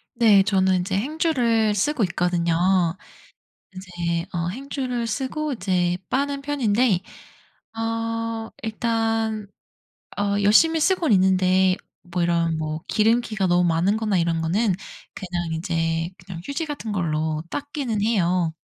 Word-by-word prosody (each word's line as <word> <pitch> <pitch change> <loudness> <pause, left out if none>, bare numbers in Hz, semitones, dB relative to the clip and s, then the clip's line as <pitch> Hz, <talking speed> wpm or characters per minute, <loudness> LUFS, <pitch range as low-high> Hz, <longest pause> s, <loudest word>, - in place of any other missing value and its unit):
네. 215 -5 +6
저는 190 -2 +2
인제 190 +2 -1
행주를 240 -5 +1
쓰고 240 +4 +1
있거든요. 175 -1 0 1.2
인제 175 -3 -3
어 170 -1 -1
행주를 255 0 -3
쓰고 275 +6 -2
이제 180 -4 0
빠는 280 +1 -1
편인데 245 -8 +1 0.8
어 225 0 -2
일단 225 -1 -1 0.7
어 205 0 +1
열심히 320 +11 +5
쓰고는 340 - +2
있는데 185 0 +3 0.3
뭐 180 0 -3
이런 170 -1 +1
뭐 155 0 -3
기름기가 220 -2 +1
너무 175 0 +3
많은 175 +6 +2
거나 215 -3 0
이런 165 -1 0
거는 195 +4 +1 0.4
그냥 175 -3 -4
이제 165 -1 -1
그냥 175 -3 -8
휴지 310 +3 -3
같은 260 -8 -5
걸로 155 -4 -1
닦기는 280 -7 -3
해요. 180 -6 +1
205 Hz, 245 characters per minute, -23 LUFS, 175-230 Hz, 1.2 s, 네